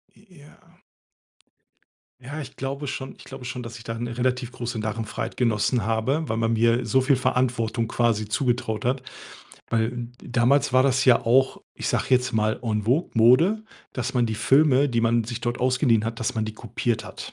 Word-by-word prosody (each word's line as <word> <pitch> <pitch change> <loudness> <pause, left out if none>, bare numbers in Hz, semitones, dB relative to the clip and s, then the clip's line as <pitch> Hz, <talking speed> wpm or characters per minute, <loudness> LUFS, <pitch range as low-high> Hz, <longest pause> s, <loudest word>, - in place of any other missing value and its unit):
J 205 - -23 0.2
ja. 150 - -17 1.7
Ja, 145 +5 -6
ich 135 -3 -10
glaube 140 +2 -4
schon 135 -1 -5
ich - - -14
glaube 135 -1 -10
schon, 125 0 -5
dass 115 0 -8
ich 115 - -13
da 115 0 -4
'ne 120 0 -5
relativ 125 0 -1
große 120 -1 -5
Narrenfreiheit 110 +1 -4
genossen 115 -1 +1
habe, 130 +8 0
weil 110 - -1
man 115 0 0
mir 115 +1 +2
so 115 +4 +3
viel 135 +2 +3
Verantwortung 125 -3 0
quasi 115 -3 0
zugetraut 120 -1 -1
hat. 130 +2 -1 0.7
Weil 115 +1 -1
damals 125 +4 +2
war 130 - +6
das 135 0 +2
ja 125 -2 +5
auch, 130 +3 +2
ich - - -4
sage - - 0
jetzt 125 0 +3
mal, 110 0 +1
en 110 -3 -1
vogue, 130 - +1
Mode, 155 - +4 0.3
dass 130 0 -3
man 125 -3 +2
die 110 - -2
Filme, 140 +3 +4
die 115 -1 +1
man 115 0 +2
sich 120 +1 -5
dort 120 0 -2
ausgeliehen 125 -3 +2
hat, 115 +2 -4
dass 115 - -1
man 110 -1 -1
die 110 - -5
kopiert 115 +1 -3
hat. - - -9
120 Hz, 190 wpm, -24 LUFS, 115-130 Hz, 1.7 s, war